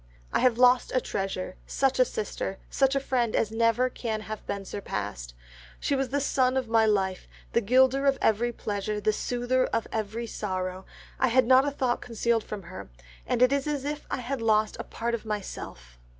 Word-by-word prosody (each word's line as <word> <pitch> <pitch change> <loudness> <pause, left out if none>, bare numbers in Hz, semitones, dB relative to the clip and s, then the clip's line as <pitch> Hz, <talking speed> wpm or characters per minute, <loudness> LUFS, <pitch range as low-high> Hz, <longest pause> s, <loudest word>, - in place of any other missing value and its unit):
"I - - +3
have 250 -3 +3
lost 250 0 +5
a - - +5
treasure, 195 -4 -4
such 270 -1 +1
a 255 - +6
sister, 205 -3 -4
such 270 0 +2
a - - +3
friend 250 -4 0
as 220 - +1
never 230 +2 +2
can 225 -3 -3
have 215 0 -7
been 200 -1 -3
surpassed. 100 - -5 0.4
She 285 - 0
was 270 -1 -1
the 285 - 0
sun 260 -2 +2
of 260 -2 -1
my 225 -1 +4
life, 190 -3 0 0.3
the 235 - +3
gilder 260 +5 +4
of 275 - +3
every 230 +3 +2
pleasure, 210 -2 -3
the 215 +1 +1
soother 245 +3 0
of 230 - -1
every 220 +2 -3
sorrow, 185 -3 -4 0.3
I 260 - +4
had 255 +1 +4
not 260 +3 +5
a - - 0
thought 255 -3 -1
concealed 230 -1 0
from 205 -2 -7
her, 170 - -9 0.4
and 245 - +2
it 255 +2 +5
is 280 +1 0
as 290 -2 -2
if 295 +1 -4
I - - -2
had 255 +1 -3
lost 215 -1 +2
a - - -3
part 235 +1 -3
of 235 - -2
myself. 65 - -6
230 Hz, 200 wpm, -27 LUFS, 210-255 Hz, 0.4 s, a